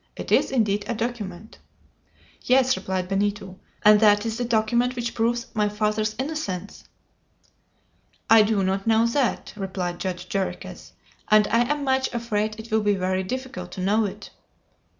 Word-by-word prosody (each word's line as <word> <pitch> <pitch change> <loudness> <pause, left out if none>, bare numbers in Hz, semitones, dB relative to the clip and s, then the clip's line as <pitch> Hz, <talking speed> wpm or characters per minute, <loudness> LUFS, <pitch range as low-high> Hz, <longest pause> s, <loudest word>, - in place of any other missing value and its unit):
It - - -7
is - - +4
indeed 210 -5 +1
a 235 - -2
document!" 220 -4 -5 0.8
"Yes," 260 0 +3
replied 185 -1 -3
Benito; 195 -1 -2 0.3
"and 210 0 +8
that 205 0 +4
is 225 -1 -2
the - - 0
document 235 +2 +1
which 240 -1 -3
proves 235 +1 0
my 210 -3 +1
father's 215 +1 -1
innocence!" 260 - -4 1.4
"I 225 -1 +7
do 210 -2 +1
not 195 +2 -1
know 225 0 +4
that," 235 +1 -1
replied 185 -3 -4
Judge 180 -1 -4
Jarriquez; 195 0 -5 0.3
"and 215 -1 +5
I 235 +4 +2
am 295 -1 -1
much 265 -1 +1
afraid 215 -2 -2
it 220 +1 -10
will 220 0 +2
be 205 -1 +2
very 185 0 -1
difficult 190 -3 -6
to 185 - -6
know 210 +4 +2
it." 195 - -7
215 Hz, 155 wpm, -24 LUFS, 195-235 Hz, 1.4 s, and